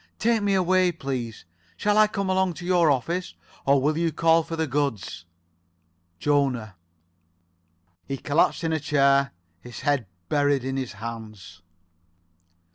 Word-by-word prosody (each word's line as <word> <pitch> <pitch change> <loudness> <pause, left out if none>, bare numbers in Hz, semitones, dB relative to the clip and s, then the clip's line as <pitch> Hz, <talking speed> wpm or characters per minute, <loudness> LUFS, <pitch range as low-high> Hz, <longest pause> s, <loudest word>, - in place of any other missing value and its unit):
Take 230 -1 +2
me 200 -1 +1
away, 185 0 +3
please. 125 - -5 0.3
Shall 205 0 +1
I 215 0 +6
come 200 -2 -3
along 190 -2 +1
to 175 - -8
your 175 -3 +3
office, 170 +7 -1 0.3
or 140 0 +5
will 150 +4 0
you 170 -1 +1
call 165 +1 +3
for 165 +1 -6
the 160 0 0
goods? 125 - -2 0.9
Jona." 130 -7 0 1.3
He 135 - -3
collapsed 145 +5 +1
in 165 -1 0
a 160 - 0
chair, 140 -2 +3 0.3
his 120 +5 -10
head 145 -7 0 0.2
buried 145 0 +2
in 135 +1 -3
his 130 -3 -3
hands. 110 -6 -9
145 Hz, 140 wpm, -25 LUFS, 125-170 Hz, 1.3 s, I